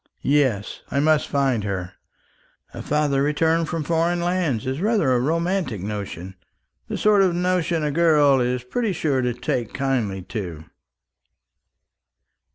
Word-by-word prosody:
Yes; 130 -9 +1
I 140 - 0
must 155 +1 +2
find 135 -6 0
her. 95 -3 -3 0.8
A - - -7
father 145 -2 +1
returned 160 +3 +1
from 165 -2 -2
foreign 170 +2 +1
lands 175 -9 -1
is 130 +4 -3
rather 205 - +2
a 125 - +3
romantic 165 - -1
notion 95 -2 -6 0.5
the - - -3
sort 210 -1 +4
of 185 -3 +2
notion 175 -2 0
a 150 - 0
girl 150 -4 +4
is 125 0 -1
pretty 210 - -2
sure 145 -6 0
to 125 -1 0
take 120 -2 -3
kindly 120 -9 -1
to." 90 -6 -6
145 Hz, 140 wpm, -23 LUFS, 120-170 Hz, 0.8 s, sort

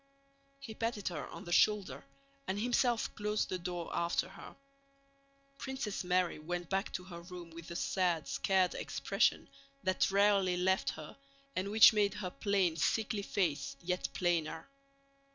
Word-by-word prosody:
He 265 -5 -8
patted 225 -3 -2
her 165 -5 -5
on - - -9
the 175 - -8
shoulder 185 -9 +2 0.4
and 190 +2 -1
himself 240 0 +1
closed 210 0 -1
the 185 - -2
door 175 -1 -4
after 170 +2 0
her. 195 - -11 1.0
Princess 265 -8 -3
Mary 180 -2 +1
went 175 +3 -5
back 195 +2 0
to 180 - -3
her 175 -2 -9
room 175 -1 -10
with 165 0 -10
the 170 - -7
sad, 175 -4 0
scared 190 -2 +2
expression 195 +2 0 0.4
that 185 0 +2
rarely 200 -2 +3
left 190 +1 +2
her 150 - -8 0.4
and 190 +2 -1
which 220 +2 +8
made 205 -2 +2
her 185 -3 -4
plain, 195 -6 +1
sickly 215 +6 0
face 160 -8 -1
yet 180 +3 -2
plainer. 165 -3 -1
185 Hz, 150 wpm, -33 LUFS, 175-205 Hz, 1.0 s, which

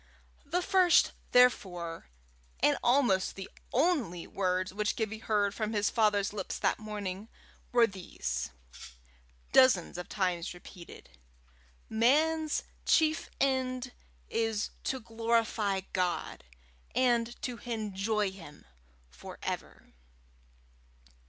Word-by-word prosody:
The 355 +2 0
first, 365 -2 +5 0.2
therefore, 180 - +2 0.5
and - - +4
almost 240 -7 +2
the 195 -1 -7 0.2
only 255 - +1
words 185 -1 -1
which 210 +1 -1
Gibbie 220 -1 -3
heard 205 -2 +1
from 215 0 -3
his 205 -1 +1
father's 205 -3 +2
lips 195 -3 -4
that - - +1
morning, 210 -1 -5 0.4
were 240 -1 +6
these, 175 - -4 1.0
dozens 235 -10 +5
of 180 - -7
times 180 -3 -1
repeated 170 - -13 0.7
"Man's 305 +8 +2 0.2
chief 315 -1 +2
end 255 -2 0 0.4
is 225 -2 -1
to 265 - -1
glorify 225 -3 0
God, 180 - -2 0.5
and 240 -2 +2
to 245 -2 -4
enjoy 210 -3 -1
Him 165 -6 -13 0.5
for 65 - -10
ever." - - -6
215 Hz, 100 wpm, -30 LUFS, 190-245 Hz, 1.0 s, were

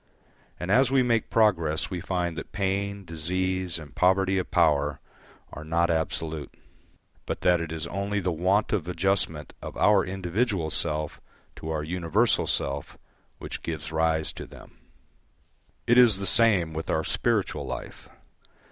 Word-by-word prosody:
And 90 +2 -3
as 130 +4 +5
we 135 -1 +3
make 115 -3 +1
progress 85 -9 +2
we 90 -2 -3
find 90 -2 -2
that 80 - -7
pain, 100 0 -2
disease, 90 +2 -2
and 75 -4 -11
poverty 95 +1 +3
of 90 - -4
power 75 -5 +2 0.5
are 75 - -7
not 85 +2 +1
absolute, 80 -2 -2 0.8
but - - -3
that 85 -3 +2
is 80 0 -4
only 100 +3 -2
the 90 -2 -1
want 95 +7 +1
of 90 -6 -1
adjustment 90 -4 -1
of - - -7
our 105 -2 +4
individual 95 -1 -1
self 75 -2 -2 0.4
to 80 - -7
our 80 -1 -2
universal 90 +7 +1
self 70 0 -2 0.4
which - - -7
gives 80 -2 -5
rise 80 -1 0
to - - -8
them. - - -14 1.1
It 120 +1 +5
is 115 -5 +6
the 100 - -4
same 95 -6 +4
with 80 +1 -5
our 80 - +1
spiritual - - -1
life. - - -7
90 Hz, 145 wpm, -26 LUFS, 80-100 Hz, 1.1 s, is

